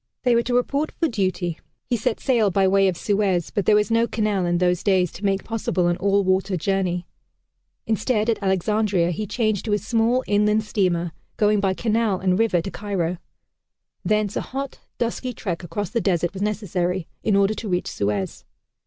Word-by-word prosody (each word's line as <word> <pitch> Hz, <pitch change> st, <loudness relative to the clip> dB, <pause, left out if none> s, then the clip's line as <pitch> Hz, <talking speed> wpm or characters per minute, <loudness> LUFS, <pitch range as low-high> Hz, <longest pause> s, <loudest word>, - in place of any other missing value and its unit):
They 250 Hz, -2 st, +4 dB
were 235 Hz, -, +4 dB
to 245 Hz, +1 st, -1 dB
report 280 Hz, +5 st, 0 dB
for 330 Hz, -, 0 dB
duty. 185 Hz, -, -1 dB, 0.3 s
He 245 Hz, -, 0 dB
set 230 Hz, +1 st, -1 dB
sail 235 Hz, -6 st, +2 dB
by 195 Hz, +1 st, +2 dB
way 195 Hz, +1 st, +4 dB
of 180 Hz, -3 st, 0 dB
Suez, 195 Hz, -4 st, 0 dB
but 200 Hz, -3 st, -2 dB
there 215 Hz, -, +6 dB
was 210 Hz, +2 st, +2 dB
no 230 Hz, +1 st, +3 dB
canal 210 Hz, -6 st, 0 dB
in 175 Hz, 0 st, +1 dB
those 180 Hz, -1 st, +1 dB
days 185 Hz, -4 st, +2 dB
to 195 Hz, -, -11 dB
make 195 Hz, -1 st, +1 dB
possible 215 Hz, -5 st, -1 dB
an 175 Hz, 0 st, +1 dB
all 200 Hz, +2 st, +2 dB
water 190 Hz, 0 st, +1 dB
journey. 180 Hz, -1 st, -1 dB, 0.8 s
Instead, 220 Hz, 0 st, 0 dB
at 230 Hz, -2 st, 0 dB
Alexandria 190 Hz, -1 st, +1 dB
he 210 Hz, +5 st, -3 dB
changed 215 Hz, -2 st, 0 dB
to 215 Hz, -, 0 dB
a -, -, +4 dB
small 230 Hz, +4 st, +1 dB
inland 210 Hz, +1 st, +2 dB
steamer 180 Hz, -5 st, 0 dB, 0.3 s
going 210 Hz, 0 st, +3 dB
by 195 Hz, -1 st, +1 dB
canal 220 Hz, -3 st, +1 dB
and 185 Hz, 0 st, +1 dB
river 220 Hz, -7 st, +2 dB
to 195 Hz, -, -5 dB
Cairo. 180 Hz, -4 st, -2 dB, 0.8 s
Thence 210 Hz, -1 st, +1 dB
a -, -, 0 dB
hot 275 Hz, +1 st, -5 dB, 0.2 s
dusty 245 Hz, +2 st, -2 dB
trek 175 Hz, -6 st, -4 dB
across 205 Hz, +3 st, -4 dB
the 235 Hz, -, 0 dB
desert 175 Hz, -3 st, 0 dB
was 195 Hz, -, -6 dB
necessary, 185 Hz, -4 st, -1 dB, 0.2 s
in 210 Hz, -, +2 dB
order 200 Hz, +1 st, +3 dB
to 215 Hz, -1 st, -6 dB
reach 180 Hz, -1 st, 0 dB
Suez. 100 Hz, -2 st, -2 dB
200 Hz, 190 wpm, -23 LUFS, 180-220 Hz, 0.8 s, there